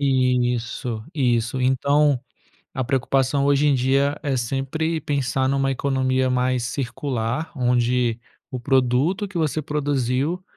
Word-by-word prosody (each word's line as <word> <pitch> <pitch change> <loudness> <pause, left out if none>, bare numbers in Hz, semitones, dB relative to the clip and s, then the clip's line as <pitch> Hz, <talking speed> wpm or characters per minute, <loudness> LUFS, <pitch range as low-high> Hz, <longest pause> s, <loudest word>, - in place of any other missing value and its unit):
Isso, 125 -3 0
isso, 120 -2 0
então, 140 +2 +2 0.5
a 130 - -1
preocupação 135 +1 +1
hoje 145 +1 +3
em 140 - +4
dia 135 +3 +1
é 140 -4 -1
sempre 135 +7 -2
pensar 135 -3 0
numa 135 0 +1
economia 130 -1 0
mais 125 -1 +1
circular, 125 +1 -3
onde 125 -2 +1 0.3
o 130 - -5
produto 135 - +1
que 190 -2 -6
você 155 -1 0
produziu 145 +2 -1
130 Hz, 120 wpm, -22 LUFS, 125-140 Hz, 0.5 s, em